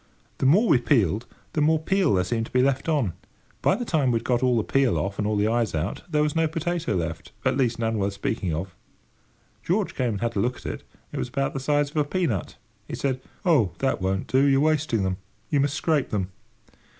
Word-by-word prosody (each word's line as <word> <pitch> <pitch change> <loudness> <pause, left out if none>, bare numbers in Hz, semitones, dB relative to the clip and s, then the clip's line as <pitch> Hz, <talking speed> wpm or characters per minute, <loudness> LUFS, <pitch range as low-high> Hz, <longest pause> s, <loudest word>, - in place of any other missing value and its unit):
The 130 - +3
more 200 - +5
we 130 - +5
peeled, 115 - +1 0.3
the 155 - +1
more 160 +2 +4
peel 180 - +2
there 90 - +2
seemed 115 +4 -2
to - - -19
be 125 0 +3
left 135 +3 +1
on; 135 - +1 0.5
by - - +3
the 245 +3 -4
time 150 - +1
we 120 - +2
had 115 - -5
got 125 -1 +1
all 125 -2 +3
the 110 - +1
peel 135 -1 +2
off 100 0 -3
and 105 - 0
all 105 -1 0
the 105 +1 +2
eyes 115 -4 0
out, 80 +6 -2
there 150 -2 +2
was 150 +1 -1
no 165 0 +3
potato 165 - -2
left—at 85 +9 -2
least 125 -4 +1
none 115 -1 -1
worth 100 0 0
speaking 100 -2 -2
of. 85 +4 -4 0.9
George 195 +3 0
came 125 -4 0
and 100 - -5
had 115 0 -1
a - - +1
look 125 +4 +1
at - - -15
it—it - - -8
was - - -2
about 135 +1 -1
the 135 - -3
size 145 +1 +1
of 155 - -7
a 150 - +4
pea 180 +5 -1
nut. 110 - -2 0.3
He - - -4
said: 130 -2 -1 0.2
"Oh, 130 - +3
that 135 -7 0
won't 95 +1 0
do! 130 +1 +3
You're 135 -1 +4
wasting 150 -8 +1
them. 95 -1 -1 0.3
You 145 - +3
must 140 +1 +1
scrape 155 -3 +1
them." 95 -3 -2
130 Hz, 235 wpm, -25 LUFS, 105-150 Hz, 0.9 s, more